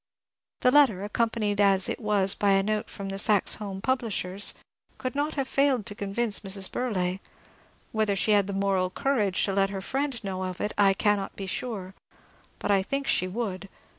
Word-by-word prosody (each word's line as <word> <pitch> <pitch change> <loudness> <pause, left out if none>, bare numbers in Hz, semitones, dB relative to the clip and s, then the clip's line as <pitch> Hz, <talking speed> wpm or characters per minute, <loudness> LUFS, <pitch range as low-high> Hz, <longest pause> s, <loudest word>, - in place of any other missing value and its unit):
The 250 - +4
letter, 255 -10 +4
accompanied 210 -1 0
as 195 -2 +3
it - - -3
was 205 -3 +1
by 200 -1 +2
a 195 0 +3
note 215 +1 -2
from 200 -1 -7
the 195 0 -3
Saxe 210 -1 +4
Holm 195 -2 -5
publishers, 210 -6 -1 0.4
could 255 - -4
not 290 +2 -2
have 275 -3 -1
failed 275 -6 +2
to - - -2
convince 205 +2 0
Mrs. 195 -1 0
Burleigh. 190 -7 -1 0.7
Whether 215 -2 +1
she 205 +2 +2
had 200 -2 +4
the 200 - -4
moral 195 -2 +1
courage 210 -3 +1
to 195 - -2
let 195 0 +2
her 195 -1 -4
friend 265 +3 -3
know 190 -1 -4
of 185 -1 -6
it 210 - -2
I 195 -1 +4
cannot 205 -1 0
be 195 - -6
sure, 190 -2 -4 0.6
but - - -2
I 195 -1 +4
think 275 +8 -3
she 185 - +2
would. 195 -1 -4
205 Hz, 190 wpm, -27 LUFS, 195-230 Hz, 0.7 s, The